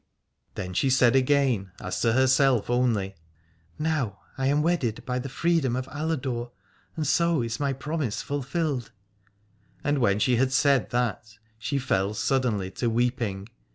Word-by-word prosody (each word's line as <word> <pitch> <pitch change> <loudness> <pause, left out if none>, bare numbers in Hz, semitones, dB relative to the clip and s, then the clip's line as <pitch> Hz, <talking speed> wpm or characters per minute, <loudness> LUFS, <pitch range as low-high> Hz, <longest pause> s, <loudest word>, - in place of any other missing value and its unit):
Then 90 0 -5
she 135 +8 +1
said 125 -1 +4
again 130 -8 +2
as 90 0 -4
to 115 - +3
herself 130 -2 +3
only: 115 -6 +1 0.6
Now 150 -10 -1 0.2
am 135 +2 +1
I - - +3
wedded 150 -9 0
by 125 -1 -1
the 135 +2 -5
freedom 160 -3 +1
of 130 0 -2
Aladore, 135 -6 -3 0.5
and 155 - -2
so 170 -2 +2
is 115 0 -3
my 140 -1 0
promise 140 -3 -3
fulfilled. 140 -2 -2 0.9
And 145 0 +1
when 100 -5 +3
she 120 +3 +2
had 130 +2 +2
said 135 -2 +3
that 110 -3 -2 0.2
she 140 +5 -2
fell 105 -6 0
suddenly 110 -6 0
to 120 - -1
weeping. 115 -4 -1
125 Hz, 150 wpm, -26 LUFS, 115-140 Hz, 0.9 s, said